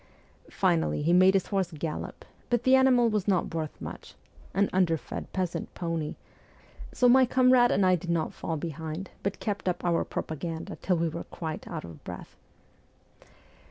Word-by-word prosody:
Finally 80 - +1
he 170 +3 +3
made 185 +2 +6
his 190 - +2
horse 190 -3 -1
gallop; 155 0 -5 0.2
but 240 -1 +1
the 260 - +4
animal 260 -2 +5
was 215 -3 -1
not 185 -5 +1
worth 160 -2 -4
much - - -9 0.4
an 200 +1 +3
underfed 175 -4 -1
peasant 185 -2 -3
pony 165 -3 -3 0.8
so 250 - +3
my 260 +2 +7
comrade 255 -1 +5
and 195 - +3
I 185 0 +5
did 170 +1 -8
not 170 -2 0
fall 165 - -3
behind, 160 +3 -5
but 200 0 -3
kept 200 -3 -2
up 180 - -3
our 170 -1 +2
propaganda 160 +1 -5
till 180 - +1
we 165 0 +1
were 165 +1 -5
quite 160 -2 -6
out - - -5
of 85 -3 -11
breath.' - - -9
180 Hz, 165 wpm, -28 LUFS, 160-205 Hz, 0.8 s, my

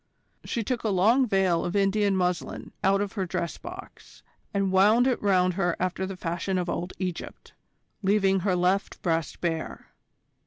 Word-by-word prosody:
She 230 - -2
took 245 +2 -2
a 220 - 0
long 220 +7 +4
veil 190 -5 +2
of 175 - -3
Indian 200 0 +2
muslin 180 -1 -2
out 195 +1 +3
of 205 -1 -3
her 190 -4 -2
dress 170 -1 -3
box 365 +2 -11 0.3
and 195 -1 0
wound 210 +6 +5
it 260 -2 +1
round 185 -2 +3
her 175 -2 0
after 185 +1 -1
the 190 -1 -6
fashion 175 +3 -2
of 180 0 -1
old 175 +2 -3
Egypt, 180 -3 -6 0.5
leaving 195 -1 +3
her 185 0 +1
left 180 +2 0
breast 165 -2 -1
bare. 165 -2 -4
190 Hz, 165 wpm, -26 LUFS, 180-205 Hz, 0.5 s, wound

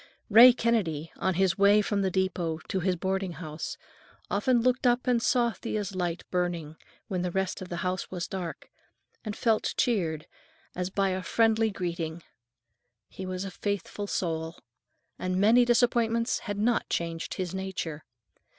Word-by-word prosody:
Ray 235 +4 +10
Kennedy, 195 -11 0
on 190 -1 0
his 190 +1 +2
way 205 +1 +6
from 205 -1 0
the 190 - +1
depot 180 -3 -1
to 190 - 0
his 185 0 +1
boardinghouse, 175 -4 -4 0.5
often 240 +5 +2
looked 255 0 +2
up 245 +1 +2
and 245 -2 +2
saw 240 -1 +2
Thea's 210 -3 -4
light 175 -2 -2
burning 175 -4 -2 0.3
when 185 -2 -2
the 180 - -1
rest 190 +1 -2
of 185 - -7
the 175 - -4
house 185 +1 -2
was 180 -1 -4
dark, 180 -4 -6 0.5
and 210 -2 -4
felt 225 -3 +1
cheered 170 - 0 0.5
as 180 0 -3
by 195 0 +1
a 185 0 -2
friendly 225 +2 +2
greeting. 170 -4 -4 0.9
He 190 - -7
was 185 +1 -3
a 195 - -5
faithful 205 +1 -3
soul, 165 -3 -2 0.6
and 185 0 -1
many 230 +5 +6
disappointments 235 -1 +2
had 205 - -2
not 230 +3 +1
changed 165 -1 -3
his 185 -1 -3
nature. 190 -5 -4
190 Hz, 155 wpm, -28 LUFS, 175-220 Hz, 0.9 s, Ray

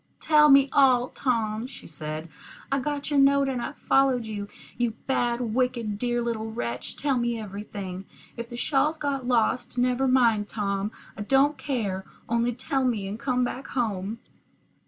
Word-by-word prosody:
"Tell 300 -1 +5
me 275 0 +7
all, 255 -3 +4
Tom," 225 -3 -1
she 260 - -12
said. 155 +1 -6 0.4
"I 275 - +2
got 285 +2 -3
your 285 - +3
note, 275 0 +5
and 255 -2 -2
I - - -4
followed 265 -3 +2
you. 205 -2 -5 0.3
You 240 -2 -1
bad, 240 -3 0
wicked, 235 -4 0
dear 240 0 0
little 225 -2 -2
wretch, 120 - -4
tell 275 -3 +1
me 235 -1 -1
everything. 200 -2 -6 0.3
If 235 0 -6
the 240 - -7
shawl's 300 +5 +1
got 275 -4 -2
lost, 245 0 +1
never 250 +2 +2
mind, 230 -5 +3
Tom; 200 -1 -2 0.2
I - - -7
don't 270 +7 +3
care; 210 -9 -2 0.2
only 235 +1 +1
tell 265 +3 -1
me, 220 -6 0
and 205 +3 -5
come 250 -1 0
back 255 +2 -4
home." 215 -4 -2
240 Hz, 165 wpm, -26 LUFS, 215-270 Hz, 0.4 s, me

